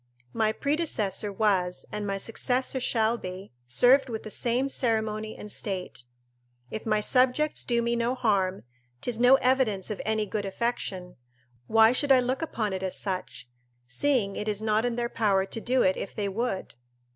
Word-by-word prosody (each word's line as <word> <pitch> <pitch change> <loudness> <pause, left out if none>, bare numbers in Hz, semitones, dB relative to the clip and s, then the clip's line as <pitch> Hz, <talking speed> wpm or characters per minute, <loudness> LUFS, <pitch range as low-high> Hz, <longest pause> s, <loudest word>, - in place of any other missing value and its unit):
My 220 -1 +2
predecessor 220 - -1
was, 190 -3 0
and 210 -1 -4
my 195 0 -1
successor 250 +5 -1
shall 230 -1 +1
be, 185 +2 -8 0.2
served 250 - +4
with 220 -2 -4
the 215 - -8
same 245 +5 0
ceremony 220 -4 -1
and 210 - -8
state. 185 - -5 0.7
If 220 - -5
my 215 -1 +2
subjects 255 +6 +2
do 235 -1 +1
me 235 0 +1
no 235 +2 0
harm, 200 -6 0 0.4
'tis 235 -2 -3
no 250 +2 +7
evidence 250 -7 +1
of 210 - -4
any 220 0 0
good 210 0 -3
affection; 195 -3 -3 0.5
why 225 0 +6
should 280 +3 +1
I 260 - +7
look 255 +3 -1
upon 220 -10 -2
it 190 - -3
as 190 -1 -2
such, 185 -10 -4 0.4
seeing 200 - 0
it 210 - -4
is 210 -1 -1
not 220 +1 +1
in 240 -1 -1
their 240 0 -1
power 200 -5 +1
to 225 - -5
do 255 +2 +2
it 185 - +3
if - - -6
they 205 -2 -1
would? 195 - -3
220 Hz, 175 wpm, -27 LUFS, 200-245 Hz, 0.7 s, no